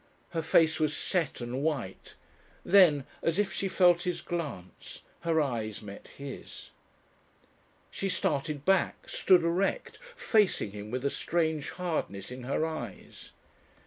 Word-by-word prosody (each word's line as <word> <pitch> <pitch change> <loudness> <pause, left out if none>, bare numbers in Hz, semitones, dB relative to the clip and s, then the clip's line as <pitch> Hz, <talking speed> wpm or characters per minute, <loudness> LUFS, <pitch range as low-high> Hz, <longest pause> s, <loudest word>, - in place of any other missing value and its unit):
Her 165 - -2
face 160 0 +3
was 155 -1 +1
set 165 -8 -1
and 120 +3 -3
white. 140 -11 -3 0.5
Then, 170 -8 +6 0.2
as 165 +1 0
if 200 -3 +1
she 195 - -1
felt 175 -2 +4
his 180 -1 -2
glance, 145 - -6 0.2
her 165 -1 +1
eyes 115 -7 -2
met 100 -1 -10
his. 140 -1 -9 1.2
She 195 - -2
started 150 -6 -1
back, 195 -1 +1
stood 180 -3 +4
erect, 180 - -1 0.2
facing 210 - +2
him 105 +1 -8
with 130 +3 -3
a 140 - +2
strange 160 -3 -1
hardness 155 - -3
in 125 -1 -7
her 140 +4 0
eyes. 160 -1 -7
160 Hz, 135 wpm, -29 LUFS, 130-175 Hz, 1.2 s, Then